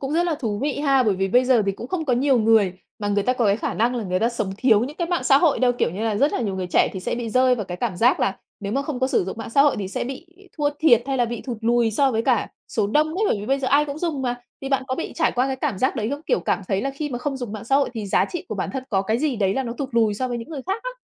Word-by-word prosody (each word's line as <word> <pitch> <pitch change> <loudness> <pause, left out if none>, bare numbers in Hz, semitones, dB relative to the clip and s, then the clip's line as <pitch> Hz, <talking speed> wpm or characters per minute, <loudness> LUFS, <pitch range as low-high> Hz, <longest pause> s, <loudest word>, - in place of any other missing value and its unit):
cũng 270 +1 -3
rất 335 +2 +3
là 335 - 0
thú 225 -9 -3
vị 285 +3 -2
ha, 275 -3 +3
bởi 215 -5 +2
vì 195 +1 -1
bây 245 +6 +4
giờ 250 -3 +4
thì 195 - +1
cũng 225 - -8
không 330 +1 -2
có 265 - 0
nhiều 260 +1 +3
người 220 -4 +4 0.3
mà 205 -2 -2
người 205 0 +1
ta 250 - +2
có 250 -2 0
cái 200 0 +3
khả - - -3
năng 235 +3 +1
là 235 -3 -3
người 185 -1 0
ta 230 - +3
sống 225 -5 -3
thiếu 220 -2 +4
những 290 +4 -8
cái 345 - -1
mạng 350 -7 -1
xã 270 +1 +6
hội 305 -2 +3
đâu. 250 -1 +3
Kiểu - - +1
như 185 +5 -6
là 220 -2 0
rất 280 +7 +2
là - - -1
nhiều 200 -5 -2
người 185 -1 -3
trẻ 180 - +3
thì 190 - -5
sẽ 185 - -2
bị 235 -2 -4
rơi 255 +1 +4
vào 220 -4 -4
cái 180 -1 -6
cảm 205 -4 -2
giác 245 +7 +3
là 195 - 0 0.2
nếu 200 0 -4
mà 275 +3 0
không 280 -3 -5
có 260 - +3
sử 260 - +1
dụng 190 - -5
mạng 225 - -6
xã 275 +4 +5
hội 290 -1 +3
thì 195 - -3
sẽ - - -3
bị 270 +7 -7 0.3
thua 295 -2 +1
thiệt 240 -8 +5
hay 270 -1 -1
là 245 - +2
bị 235 0 -4
thụt 245 -4 -6
lùi 235 0 +2
so 270 +5 +2
với 225 -1 0
cả 250 0 +1 0.2
số 215 -3 0
đông 300 +9 +2
ấy, 355 +7 -2
bởi - - +1
vì 205 - -6
bây 270 +3 +1
giờ 265 -1 -1
ai 290 +2 +4
cũng 285 0 -6
dùng 315 -5 -2
mà, 245 -1 0 0.3
thì 270 - -5
bạn 270 -1 +1
có 260 - 0
bị 330 - -5
trải 330 - +1
qua 250 +1 +1
cái 265 -1 -2
cảm 260 -7 -2
giác 260 +4 +1
đấy 220 0 -1
không? 285 +1 -3
Kiểu, - - +1
cảm - - 0
thấy 195 -1 +1
là 275 - -1
khi 295 +2 -4
mà 245 - -3
không 275 +2 -3
dùng 245 -5 -6
mạng 215 0 -6
xã 270 +4 +3
hội 280 - +1
thì 215 -3 -4
giá 195 - +2
trị 350 - -6
của - - -3
bản - - -3
thân 265 - -3
có 195 -5 +1
cái 220 +4 0
gì 285 -2 0
đấy 195 -2 +1
là 270 - 0
nó 235 -2 -4
thụt 275 - -3
lùi 225 -3 +2
so 255 +5 -2
với 240 -1 -3
những 230 - -8
người 295 -5 -6
khác 390 +4 -2
á. - - -4
250 Hz, 360 wpm, -23 LUFS, 215-275 Hz, 0.3 s, xã